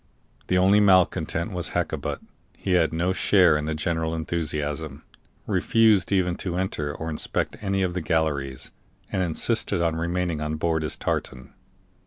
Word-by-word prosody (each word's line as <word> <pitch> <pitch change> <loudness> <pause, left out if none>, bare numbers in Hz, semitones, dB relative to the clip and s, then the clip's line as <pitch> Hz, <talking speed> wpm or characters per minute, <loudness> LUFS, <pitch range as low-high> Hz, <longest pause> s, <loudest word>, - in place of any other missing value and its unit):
The 90 - +2
only 95 +3 +5
malcontent 95 -3 +2
was 90 -2 -4
Hakkabut; - - -2 0.4
he 95 - -3
had 90 -3 +3
no 85 +3 0
share 90 -4 +4
in 75 0 -1
the 80 0 -2
general 80 0 -1
enthusiasm, 75 -3 -3 0.4
refused 110 -5 +3
even 90 -3 +2
to 90 -2 -3
enter 80 -6 -2
or 80 +2 -6
inspect 75 - -2
any 95 -2 0
of 90 -1 -1
the 90 - -2
galleries, 70 -5 -1 0.4
and 95 - 0
insisted 85 0 0
on 85 -1 +1
remaining 85 -1 -1
on 75 0 -2
board 80 0 0
his 75 - -3
tartan. 65 -1 -3
85 Hz, 155 wpm, -25 LUFS, 80-90 Hz, 0.4 s, only